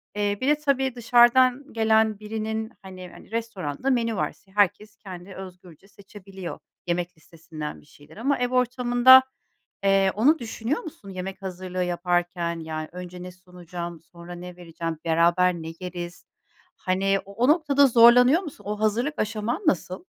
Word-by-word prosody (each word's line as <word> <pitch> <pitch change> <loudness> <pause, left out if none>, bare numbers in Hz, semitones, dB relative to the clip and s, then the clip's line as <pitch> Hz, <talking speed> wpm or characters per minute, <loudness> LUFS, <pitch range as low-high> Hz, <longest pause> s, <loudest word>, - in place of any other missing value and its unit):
Eee, 205 -1 0
bir 260 - -1
de, 295 - +5
tabii, 270 -4 0
dışarıdan 245 +3 +4
gelen 220 -1 +2
birinin, 220 +1 -4
hani 185 -1 -10
hani, - - -16
restoranda 225 - -3
menü 230 -3 +1
var. - - -2 0.2
Herkes 205 +1 +1
kendi 185 -1 -10
özgürce 180 -1 -12
seçebiliyor 195 -2 -10 0.3
yemek 175 0 -2
listesinden 160 -1 -9
bir - - -23
şeyler 145 +2 -18
ama 275 +6 0
ev 245 0 0
ortamında, 250 +1 +6 0.6
eee, 195 -1 +3
onu 280 +10 +3
düşünüyor 235 +4 -3
musun 285 - -11
yemek 190 +1 -7
hazırlığı 185 -1 -4
yaparken, 175 -1 -1
yani, 155 -1 -5
önce 180 0 -9
ne 180 - -8
sunacağım 175 -2 -9
sonra 170 +1 -12
ne 180 0 -9
vereceğim 165 -2 -6
beraber 170 +2 +3
ne 165 -2 -7
yeriz? 175 -1 -7 0.5
Hani, 195 +1 0
o 200 - -12
o 235 +5 +1
noktada 290 -3 +4
zorlanıyor 245 +6 +6
musun, 290 - -10
o 210 0 -3
hazırlık 230 +8 0
aşaman 225 - -2
nasıl? 185 - -1
195 Hz, 150 wpm, -24 LUFS, 175-235 Hz, 0.6 s, ortamında